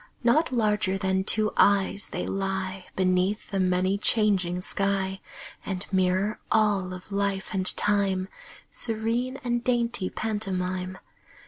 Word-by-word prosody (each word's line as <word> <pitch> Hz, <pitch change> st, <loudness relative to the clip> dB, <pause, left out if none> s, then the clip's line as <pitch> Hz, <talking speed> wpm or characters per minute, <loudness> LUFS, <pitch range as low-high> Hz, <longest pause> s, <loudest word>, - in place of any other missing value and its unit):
Not 285 Hz, +7 st, +3 dB
larger 210 Hz, -5 st, +1 dB
than 190 Hz, 0 st, 0 dB
two 215 Hz, +2 st, +2 dB
eyes, 200 Hz, 0 st, +3 dB
they -, -, -4 dB
lie 190 Hz, -1 st, -3 dB
Beneath 185 Hz, +3 st, 0 dB
the 195 Hz, -, -1 dB
many 185 Hz, +1 st, +1 dB
changing 195 Hz, -5 st, +3 dB
sky 195 Hz, 0 st, -2 dB, 0.4 s
And 190 Hz, 0 st, -4 dB
mirror 190 Hz, +2 st, +1 dB
all 205 Hz, -4 st, +2 dB
of 185 Hz, +2 st, -9 dB
life 200 Hz, 0 st, -1 dB
and 185 Hz, -1 st, +1 dB
time, 195 Hz, -2 st, +1 dB, 0.4 s
Serene 230 Hz, +3 st, 0 dB
and 240 Hz, -1 st, -1 dB
dainty 235 Hz, -5 st, 0 dB
pantomime. 185 Hz, -4 st, -3 dB
195 Hz, 120 wpm, -26 LUFS, 185-215 Hz, 0.4 s, Not